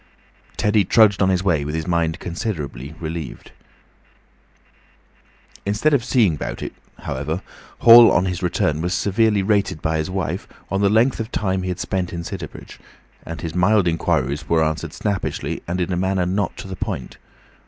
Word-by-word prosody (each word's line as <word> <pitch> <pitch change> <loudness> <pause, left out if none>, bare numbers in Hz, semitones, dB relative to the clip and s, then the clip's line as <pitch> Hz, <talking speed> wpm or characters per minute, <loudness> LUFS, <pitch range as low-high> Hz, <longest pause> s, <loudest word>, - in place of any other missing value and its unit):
Teddy 105 0 +3
trudged 105 +1 +4
on 95 - +4
his 95 -1 +1
way 85 -7 +2
with 75 +2 -4
his 80 -1 -2
mind 85 -1 0
considerably 80 - -5
relieved. 80 -5 -6 2.1
Instead 105 +10 +1
of 135 -5 +3
"seeing 115 - +2
'bout - - -5
it," - - -5 0.3
however, - - -3 0.4
Hall 115 0 +9
on 90 - +2
his 90 -1 -3
return 80 -4 0
was 90 +2 -1
severely 105 0 +2
rated 100 -5 +1
by 80 +1 -1
his 80 - -2
wife 90 -3 -3 0.2
on 95 0 0
the 100 - +4
length 115 +5 +3
of 115 +1 -4
time 95 -2 -1
he 90 - -3
had 90 -1 -3
spent 90 -1 -2
in 85 0 -4
Sidderbridge, 85 -4 -8 0.5
and 85 - -6
his 80 -1 -4
mild 95 +2 +3
inquiries 75 -3 -1
were 80 -1 +3
answered 80 0 -3
snappishly 100 -2 -3
and 90 +2 -2
in 90 +1 -1
a - - -1
manner 95 0 0
not 95 +1 -1
to - - -8
the 95 - -6
point. - - -5
90 Hz, 175 wpm, -21 LUFS, 80-100 Hz, 2.1 s, Hall